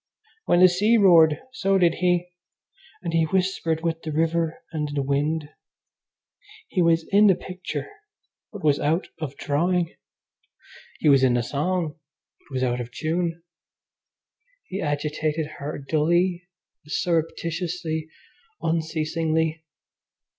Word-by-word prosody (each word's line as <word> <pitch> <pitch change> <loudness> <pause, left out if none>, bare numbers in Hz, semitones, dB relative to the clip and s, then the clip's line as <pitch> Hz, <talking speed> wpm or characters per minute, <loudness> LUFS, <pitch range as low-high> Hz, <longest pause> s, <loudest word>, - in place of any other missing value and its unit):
When 175 - +4
the 185 - +10
sea 205 +6 +3
roared 165 -7 +6
so 195 -6 +2
did 175 -3 +4
he, 180 0 +1 0.7
and 170 -2 -3
he 165 -1 +3
whispered 175 -2 0
with 165 -1 -1
the 155 - -5
river 165 +1 0
and 150 -3 -2
the 140 - 0
wind. 145 +2 -1 1.2
He 185 - 0
was 165 -1 +3
in 205 +2 +6
the 190 - +5
picture 185 +1 -6 0.6
but 205 -3 -9
was 145 -2 +3
out 160 +5 0
of 140 -3 -5
drawing. 170 +4 0 1.1
He - - +2
was 135 -2 +6
in 130 -2 +4
the 120 - +1
song 160 +4 -2 0.4
but - - -18
was 130 - 0
out 125 -1 0
of 120 0 -7
tune. 165 +3 -2 1.2
He 195 +2 -5
agitated 150 +1 -1
her 145 +2 -4
dully, 170 +5 +1 0.4
surreptitiously, 165 0 -2 0.5
unceasingly. 160 0 -1
165 Hz, 125 wpm, -24 LUFS, 150-175 Hz, 1.2 s, the